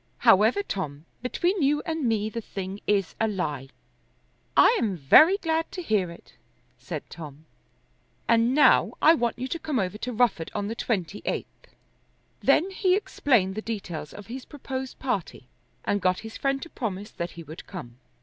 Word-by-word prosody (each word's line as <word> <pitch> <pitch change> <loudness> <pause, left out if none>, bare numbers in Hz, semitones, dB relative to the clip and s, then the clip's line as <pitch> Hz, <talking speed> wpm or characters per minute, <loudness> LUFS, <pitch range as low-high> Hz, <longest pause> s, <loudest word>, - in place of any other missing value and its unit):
However, 220 - +5
Tom, 155 - -5 0.2
between 350 - 0
you 295 +1 +2
and 320 -2 -2
me 215 -2 +1
the 230 +2 -4
thing 195 -1 -6
is 200 -3 +1
a 225 - +3
lie." 150 -10 -3 0.9
"I 475 - +7
am 200 -5 0
very 310 - +7
glad 325 -3 -1
to 360 - -5
hear 205 - +1
it," 170 - -14 0.5
said - - -6
Tom. 155 -2 -10 0.8
"And 230 +2 +3
now 295 - +5
I 320 - +7
want 240 -8 0
you 255 +1 -3
to 335 - -3
come 300 -4 -2
over 195 0 -1
to 250 - -3
Rufford 225 -8 +1
on 205 -1 -1
the - - -2
twenty 205 -5 -2
eighth." - - -5 0.7
Then 375 +4 +3
he 375 -1 +2
explained 240 - +1
the 215 - -4
details 180 -9 -5
of 205 - -10
his 250 +5 -7
proposed 265 -2 -6
party, 195 - -3 0.4
and 205 0 0
got 185 0 +1
his 220 - -8
friend 275 0 0
to 335 - -9
promise 205 -4 -4
that 170 0 -5
he 170 - -7
would 160 +2 -10
come. 130 -10 -9
220 Hz, 175 wpm, -26 LUFS, 185-275 Hz, 0.9 s, I